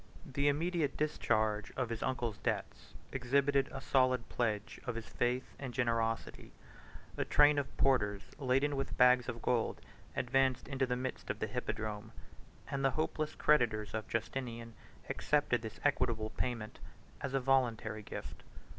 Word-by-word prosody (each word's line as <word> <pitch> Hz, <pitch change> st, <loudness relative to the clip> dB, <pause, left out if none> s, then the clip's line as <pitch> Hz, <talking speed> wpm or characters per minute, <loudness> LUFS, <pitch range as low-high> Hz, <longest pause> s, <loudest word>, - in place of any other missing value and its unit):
The 140 Hz, +2 st, 0 dB
immediate 155 Hz, 0 st, +1 dB
discharge 110 Hz, -8 st, +1 dB
of 130 Hz, -3 st, 0 dB
his 115 Hz, -1 st, -4 dB
uncle's 120 Hz, -5 st, -1 dB
debts -, -, -3 dB, 0.2 s
exhibited 140 Hz, +2 st, +2 dB
a -, -, -5 dB
solid 130 Hz, -2 st, +2 dB
pledge 110 Hz, -3 st, -1 dB
of 125 Hz, -, -2 dB
his 115 Hz, -1 st, -5 dB
faith 125 Hz, +1 st, -1 dB
and 130 Hz, -4 st, -5 dB
generosity: 115 Hz, -2 st, -1 dB, 0.6 s
a -, -, +1 dB
train 145 Hz, 0 st, +5 dB
of 140 Hz, -, -5 dB
porters, 105 Hz, -7 st, +2 dB, 0.2 s
laden 135 Hz, +2 st, +2 dB
with 135 Hz, -, -3 dB
bags 125 Hz, 0 st, +6 dB
of 120 Hz, -1 st, -5 dB
gold, 120 Hz, -3 st, +1 dB, 0.4 s
advanced 135 Hz, -1 st, +2 dB
into 135 Hz, -1 st, 0 dB
the 125 Hz, -, 0 dB
midst 130 Hz, +1 st, -4 dB
of -, -, -1 dB
the -, -, -1 dB
hippodrome, 110 Hz, 0 st, -4 dB, 0.6 s
and 140 Hz, 0 st, -1 dB
the 135 Hz, -, +5 dB
hopeless 155 Hz, -1 st, -1 dB
creditors 110 Hz, -9 st, +2 dB
of 110 Hz, 0 st, -3 dB
Justinian 115 Hz, 0 st, -3 dB, 0.3 s
accepted 145 Hz, -5 st, +1 dB
this 110 Hz, -1 st, -7 dB
equitable 115 Hz, -6 st, +1 dB
payment 115 Hz, -4 st, -3 dB, 0.4 s
as 135 Hz, -1 st, -2 dB
a -, -, +3 dB
voluntary 120 Hz, -5 st, +1 dB
gift. -, -, -7 dB
125 Hz, 145 wpm, -34 LUFS, 115-135 Hz, 0.6 s, bags